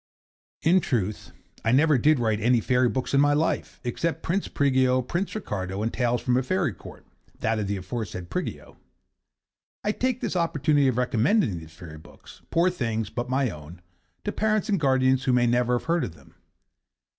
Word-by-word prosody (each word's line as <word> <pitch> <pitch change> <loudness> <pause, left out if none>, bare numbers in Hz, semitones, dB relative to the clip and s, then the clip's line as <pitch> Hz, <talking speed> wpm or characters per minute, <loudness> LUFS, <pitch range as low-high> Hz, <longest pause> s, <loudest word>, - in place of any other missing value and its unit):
In 180 +4 +5
truth 110 - -2 0.3
I 115 - +2
never 145 +1 +4
did 155 +4 +4
write 110 -3 0
any 120 +2 +3
fairy 125 +2 +2
books 130 +2 -3
in 140 - +5
my 145 0 +4
life, 155 +3 -1
except 160 +7 -2
'Prince 190 +4 -1
Prigio,' 130 -2 +2
'Prince 175 - -3
Ricardo,' 95 - -4
and 115 - -2
'Tales 120 -1 0
from 125 -1 +1
a - - +3
Fairy 170 - 0
Court' - - -13 0.3
that 110 0 0
of 105 - -2
the 100 0 -1
aforesaid 95 -2 -6
Prigio. - - -5 1.1
I 210 - +1
take 255 +2 -1
this - - -3
opportunity 150 -4 +2
of 125 -2 0
recommending 125 - +1
these 80 -1 -13
fairy 80 -4 -10
books 80 - -16
poor 175 +2 +2
things, 115 - -2
but 120 0 -4
my 130 -2 +1
own 75 +3 -11 0.4
to - - -2
parents 215 0 0
and 200 -3 +2
guardians 130 -2 +2
who 130 - +2
may 125 -1 +3
never 120 +1 +2
have - - -8
heard 170 0 +1
of 85 - -8
them. 70 - -20
125 Hz, 185 wpm, -25 LUFS, 110-155 Hz, 1.1 s, In